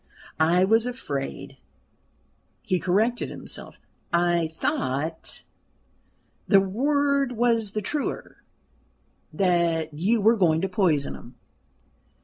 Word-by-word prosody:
I 170 +3 +4
was 225 +4 +3
afraid" 140 - -5 1.1
he 185 - 0
corrected 220 +8 +1
himself - - -7 0.4
"I 170 -1 +2
thought" 155 0 -3 1.0
the 195 - +6
word 280 +6 +1
was 230 -3 +1
the 215 - -2
truer 295 +8 -4 0.9
"that 170 -4 +1
you 195 +10 +1
were 225 +3 +4
going 165 -5 +3
to 195 - 0
poison 175 -7 +1
him." 120 +2 -12
185 Hz, 100 wpm, -25 LUFS, 160-230 Hz, 1.1 s, the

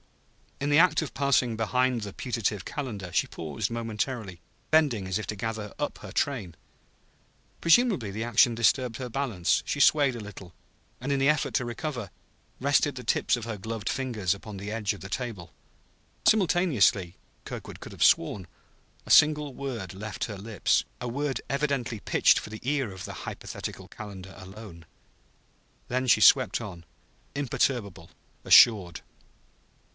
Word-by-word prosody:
In 140 - -1
the 145 - +6
act 180 0 +4
of 155 - -7
passing 130 -4 +2
behind 125 +2 +1
the 100 -2 -6
putative 110 -5 -2
Calendar, 110 - -5
she - - +2
paused 85 +6 -4
momentarily, 115 -4 -4 0.3
bending 140 -11 +3
as 95 +3 -1
if 110 - -5
to 105 - -3
gather 110 0 -4
up - - -3
her - - -10
train. 110 - -2 1.1
Presumably 170 - +4
the 110 +3 -4
action 120 +1 +4
disturbed 120 0 +2
her 125 -2 -5
balance; 115 -9 0
she 145 - -2
swayed 140 -3 +4
a - - -6
little, 100 -4 -10 0.5
and 135 +3 -3
in 140 - +1
the 135 +2 +3
effort 150 0 +1
to 125 - +1
recover, 120 - -4 0.5
rested 145 +1 +2
the 125 - -7
tips 115 - +1
of 120 -2 -6
her 115 -2 -4
gloved 110 +1 -4
fingers 115 -9 -1
upon 100 +1 -9
the 100 +2 -6
edge 110 -2 -1
of 100 - -11
the 100 - -8
table. 100 -8 -5 0.8
Simultaneously 150 - +3 0.3
(Kirkwood - - -8
could - - -10
have - - -1
sworn) 90 +2 +3 0.6
a - - -4
single 150 -2 +5
word 125 -9 -5
left 105 +3 -5
her 105 -3 -7
lips, 105 0 0 0.2
a 125 - -4
word 140 +3 -2
evidently 140 -5 -1
pitched - - +3
for - - -9
the 110 0 -8
ear 135 -4 -1
of 95 -1 -8
the - - -7
hypothetical - - -7
Calendar 95 -3 -10
alone. 95 -3 -11 1.0
Then 130 +1 -1
she - - +5
swept - - +6
on, 85 -5 -8 0.5
imperturbable, 115 -10 -1 0.3
assured. 95 -8 +6
115 Hz, 155 wpm, -27 LUFS, 100-135 Hz, 1.1 s, the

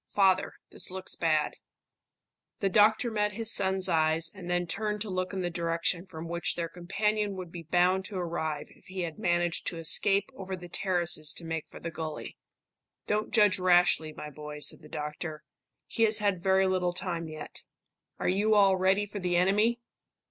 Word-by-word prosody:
Father, 190 -2 +2 0.2
this - - +3
looks 185 0 -3
bad." 155 -2 +1 1.0
The 195 - +1
doctor 215 +4 +4
met 210 -1 0
his 225 +2 -1
son's 190 -1 +2
eyes, 160 -1 +2
and 185 -3 -9
then 175 0 +1
turned 210 +4 -2
to 210 -2 -3
look 185 0 -2
in 190 -2 -3
the 175 - -2
direction 170 +1 -1
from 165 -2 -8
which 170 +1 -1
their 170 -1 -2
companion 205 +4 -1
would 180 -3 -7
be 175 - -7
bound 180 +2 +3
to 195 - -6
arrive 160 -4 -3
if - - -22
he 185 0 -5
had 165 -3 -5
managed 175 -1 0
to 170 - -2
escape 195 +5 +3
over 190 -1 -5
the 180 -1 -10
terraces 175 -5 +2
to 170 - -7
make 160 -1 -4
for - - -12
the 170 - -5
gully. 155 -2 -6 0.7
"Don't 210 +1 -1
judge 210 -4 +4
rashly, 175 -3 +4
my 150 0 -8
boy," 150 0 -8
said 150 +2 0
the 150 - -14
doctor. 150 +1 -5 0.4
"He - - -5
has 220 -1 +4
had 200 -4 0
very 190 +1 +3
little 180 -1 0
time 170 -2 -3
yet. 155 -1 -7 0.6
Are - - -2
you 205 +4 +3
all 195 -2 +5
ready 190 +2 +2
for 205 0 -7
the 180 -2 -1
enemy?" 210 +6 +2
180 Hz, 185 wpm, -29 LUFS, 165-195 Hz, 1.0 s, all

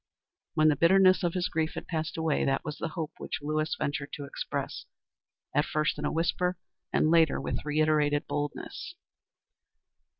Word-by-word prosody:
When 155 0 +5
the 150 - +3
bitterness 185 +5 +5
of 175 0 0
his 180 -1 +1
grief 160 -1 -1
had - - -5
passed 160 -1 -3
away, 160 -2 +1
that 135 - 0
was 150 0 -5
the - - -1
hope 160 -2 -2
which - - -3
Lewis 155 +2 -1
ventured 145 0 -2
to 145 -3 -5
express, 140 - -4 0.7
at 145 - +3
first 155 0 0
in - - -2
a - - 0
whisper, 175 +2 0 0.3
and 155 - +3
later 165 -2 +4
with - - -3
reiterated 150 -1 +2
boldness. 145 0 -4
155 Hz, 165 wpm, -29 LUFS, 150-165 Hz, 0.7 s, When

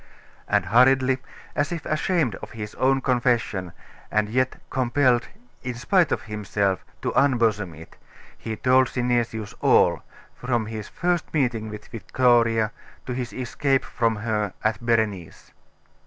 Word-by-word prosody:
And - - +2
hurriedly, 130 +2 +4 0.4
as 145 +2 0
if 170 -3 -4
ashamed 155 - +1
of - - -10
his 105 -2 -6
own 135 +1 +2
confession, 120 -8 0 0.4
and 105 0 +1
yet 130 +3 0
compelled, 125 -1 +2 0.3
in 125 -1 -4
spite 170 +7 +2
of - - -1
himself, 100 -3 -1 0.2
to - - 0
unbosom 115 - +2
it, 80 +2 -14 0.4
he 110 - -5
told 130 +3 +4
Synesius 120 -4 -1
all, - - +4 0.3
from 120 -3 -1
his 110 -1 -6
first 175 -1 -1
meeting 120 -6 0
with 105 -1 -8
Victoria 115 -2 +2 0.3
to 125 - -3
his 125 -1 -4
escape 135 +2 0
from 115 -1 0
her 105 -2 -2
at 110 +2 0
Berenice. 110 -7 -1
120 Hz, 135 wpm, -24 LUFS, 110-130 Hz, 0.4 s, hurriedly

